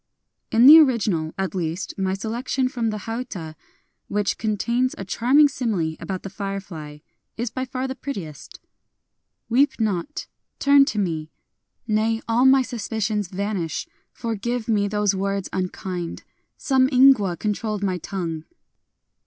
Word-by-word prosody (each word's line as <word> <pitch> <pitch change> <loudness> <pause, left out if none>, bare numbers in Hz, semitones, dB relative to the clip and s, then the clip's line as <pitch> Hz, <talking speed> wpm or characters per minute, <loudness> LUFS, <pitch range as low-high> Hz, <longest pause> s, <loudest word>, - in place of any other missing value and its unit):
In 230 +2 +5
the 310 +4 +11
original, 210 - +2
at 190 -1 -2
least, 175 0 -3
my 190 -1 -1
selection 235 +5 -2
from 240 -3 -2
the 215 -1 -4
hauta 225 -9 -5 0.3
— - - -48
which 205 -1 0
contains 235 +4 0
a 195 - -6
charming 260 +9 +4
simile 205 - -2
about 190 -2 -5
the 195 - -6
firefly 195 -7 -6 0.2
— - - -52
is 235 0 -2
by 260 +2 -3
far 255 +1 -3
the 260 - -3
prettiest: 195 - -7 0.5
— - - -55
Weep 275 +4 +3
not! 215 - -2 0.2
— - - -58
turn 280 0 +6
to 275 - -3
me!... 160 -6 -1 0.6
Nay, 220 +1 +1
all 235 +3 +3
my 265 0 +6
suspicions 220 -3 -2
vanish! 190 -3 -3 0.2
Forgive 230 +1 -3
me 205 -3 +2
those 210 -1 +1
words 195 0 -2
unkind: 185 -2 -4 0.3
some 265 -2 +2
ingwa 250 -9 +5
controlled 210 0 -2
my 185 -2 0
tongue 165 -4 -4
210 Hz, 145 wpm, -23 LUFS, 190-245 Hz, 0.6 s, the